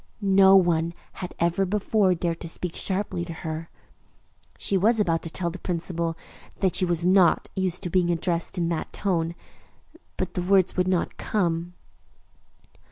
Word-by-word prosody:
No 195 0 +6
one 170 -2 +3 0.2
had 180 - -8
ever 170 +3 +1
before 200 0 +1
dared 170 -1 -2
to 170 - -7
speak 170 +1 -4
sharply 190 -2 -2
to 170 -1 -6
her. 160 +1 -4 0.9
She 200 - -1
was 220 +5 +3
about 165 -5 +1
to 165 - -4
tell 170 +1 -2
the 185 - -9
principal 170 -1 -2 0.4
that 190 -2 0
she 185 - +2
was 175 -1 -1
not 185 -2 +4
used 185 -1 0
to 175 - -2
being 180 -1 +2
addressed 170 +1 -1
in 170 -1 0
that 165 -2 -3
tone, 170 -4 -1 0.8
but - - -3
the 180 - -2
words 185 0 +3
would 180 0 +1
not 185 -2 0
come. 175 -3 -1
175 Hz, 165 wpm, -25 LUFS, 170-190 Hz, 0.9 s, No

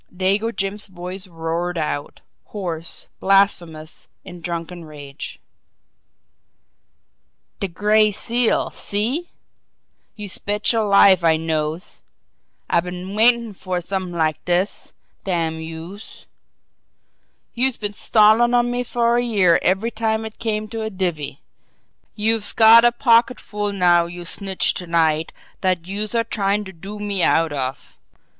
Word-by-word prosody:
Dago 195 +5 0
Jim's 200 -1 -3
voice 185 +1 -7
roared 170 +1 -3
out, 150 -2 -4 0.2
hoarse, 170 -5 -3
blasphemous, 175 -5 +1 0.2
in 180 -2 -10
drunken 170 0 -5
rage: 145 -2 -9 2.2
"De 195 - -1
Gray 210 +4 +2
Seal 235 +3 +1
see! 240 +12 -1 0.9
Youse 205 -3 -4
betcher 210 +2 +1
life 200 -3 +5
I 160 -1 +4
knows! 160 +2 -3 0.7
I - - +2
been 180 +2 -6
waitin' 230 0 +3
fer 185 -1 -4
somet'ing 180 -1 -4
like 155 -2 0
dis, 180 +3 -1 0.3
damn 165 -4 -1
youse! 165 +6 -10 1.3
Youse 255 +1 +2
been 205 -1 -3
stallin' 220 +3 +4
on 240 0 +2
me 245 0 -1
fer 240 0 +1
a - - 0
year 195 -8 +3
every 195 +5 +1
time 220 0 -1
it 220 - -9
came 215 -2 -2
to 225 0 -5
a 220 - -3
divvy. 175 -8 -3 0.7
Youse've 215 -1 +1
got 225 +1 +8
a 240 - +5
pocketful 230 -3 +1
now 175 -3 +3
youse 175 0 -6
snitched 195 -2 -1
to 180 - -7
night 160 -1 +1 0.3
dat 185 -3 0
youse 205 +4 -3
are 230 - +2
tryin' 205 -2 -1
to 190 - -10
do 195 +5 -9
me 205 -2 -2
out 165 -2 +2
of. 130 -2 -5
195 Hz, 130 wpm, -21 LUFS, 170-220 Hz, 2.2 s, got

